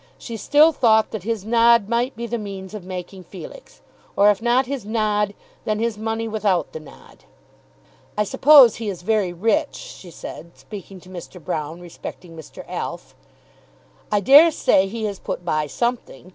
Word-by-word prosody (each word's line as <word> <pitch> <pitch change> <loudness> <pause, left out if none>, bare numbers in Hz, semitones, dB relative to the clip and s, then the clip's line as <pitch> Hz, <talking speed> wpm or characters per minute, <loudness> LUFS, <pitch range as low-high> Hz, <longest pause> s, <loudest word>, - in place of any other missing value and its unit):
She 230 - -8
still 295 +9 +4
thought 220 -6 +3
that 220 - -5
his 225 -3 -3
nod 230 -1 +4
might 240 +3 -1
be 235 +1 -5
the 235 0 -3
means 195 -2 -8
of 210 -4 -7
making 185 +1 -8
Felix, 190 - -12 0.3
or 205 +1 +5
if 205 - -3
not 245 +3 +2
his 265 -2 -5
nod, 210 -1 -1 0.3
then 215 -1 -1
his 230 0 -1
money 225 +1 -3
without 210 -5 0
the 160 - -6
nod. 155 -2 -17 0.9
"I 210 - +3
suppose 265 +2 +6
he 225 -2 -4
is 180 -3 -7
very 210 -3 +1
rich," 200 +5 0
she 180 - -11
said, 170 +1 -10
speaking 195 -2 -10
to 185 - -16
Mr. 180 0 -10
Broune 155 +1 -5
respecting 175 0 -10
Mr. 160 -2 -11
Alf. - - -6 1.0
"I 205 -1 +2
dare 290 - +8
say 195 -10 +2
he 225 +3 -6
has 205 -3 -3
put 175 - -6
by 155 -3 0
something. 235 - -4
210 Hz, 175 wpm, -21 LUFS, 185-230 Hz, 1.0 s, dare